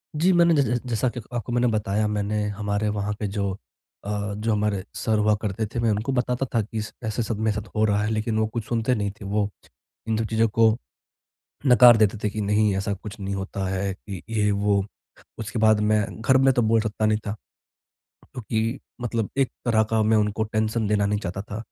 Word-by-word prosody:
जी, 170 +5 +3
मैंने 170 -1 +5
जै 145 - +4
जै 120 -1 0
जैसा 115 +1 +1
कि - - -3
आपको 120 -1 -3
मैंने 120 0 +3
बताया 105 0 0
मैंने 105 0 -1
हमारे 105 +1 -2
वहाँ 105 0 -2
पे 105 - -1
जो 100 -1 -2 0.5
अ, 105 0 -2
जो 110 +2 -1
हमारे 105 -2 0
सर 110 -1 0
हुआ 105 0 +3
करते 105 +1 -2
थे 120 - -2
मैं 115 -1 +2
उनको 105 +5 -1
बताता 125 0 0
था 115 - +3
कि 110 +1 -4
स 110 - -7
ऐसा 110 +1 -2
सब 110 -1 -3
मेरे 110 -1 +1
साथ 105 0 -5
हो 110 - +2
रहा 105 -1 +2
है 105 - -1
लेकिन 110 0 -1
वो 110 - +2
कुछ 115 0 -4
सुनते 120 +2 0
नहीं 100 -2 -1
थे, 100 0 -12
वो 100 +1 0 0.6
इन 110 - +1
सब 115 - 0
चीज़ों 115 0 +3
को 110 +1 +3 0.9
नकार 125 -2 +8
देते 110 0 +3
थे 105 - +2
कि 105 +1 -4
नहीं 105 0 +2
ऐसा 100 +1 -1
कुछ 105 +3 -9
नहीं 100 0 -3
होता 95 0 -4
है, 95 +1 -1
कि 95 -1 -9
ये 105 -2 +1
वो, 100 -1 +1 0.5
उसके 115 +1 -4
बाद 110 -1 +5
मैं 105 0 +3 0.2
घर 130 +3 +4
में 135 0 +4
तो 125 - +2
बोल 115 0 +3
सकता 110 0 -1
नहीं 110 0 +3
था। 100 - -1 1.0
क्योंकि 115 0 -2 0.2
मतलब 115 -3 -2
एक 135 -2 +2
तरह 115 -2 +3
का 110 -1 +2
मैं 110 +1 +3
उनको 105 +1 +1
टेंशन 110 +1 -1
देना 105 -1 +2
नहीं 105 +1 0
चाहता 95 -1 -4
था, 105 +1 -7
110 Hz, 220 wpm, -24 LUFS, 105-115 Hz, 1.0 s, नकार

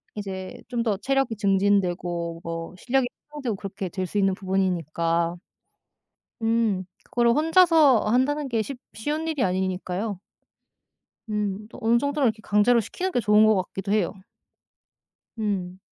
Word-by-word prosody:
이제 190 -2 -6
좀 240 -2 -1
더 215 -4 0
체력이 270 -1 0
증진되고 180 -4 +1
뭐 165 +1 -5
실력이 255 +3 +1 0.2
향상되고 265 -8 -3
그렇게 195 -1 -5
될 185 +1 -3
수 205 - -4
있는 195 -1 +3
부분이니까. 170 -3 0 1.1
음, 225 -4 +1 0.2
그거를 235 -1 +2
혼자서 320 - +5
한다는 270 +6 +1
게 225 -2 +1
쉽 275 +2 -6 0.2
쉬운 300 +9 -3
일이 305 -5 0
아니니까요. 185 +2 -2 1.1
음 210 0 -2
또 - - -12
어느 230 +1 +4
정도는 285 -2 +1
강제로 210 +4 +3
시키는 370 - -3
게 - - +1
좋은 210 -1 +5
것 215 -1 +5
같기도 195 +1 -3
해요. 205 -4 +1 1.3
음. 190 -4 -2
210 Hz, 280 characters per minute, -25 LUFS, 185-245 Hz, 1.3 s, 혼자서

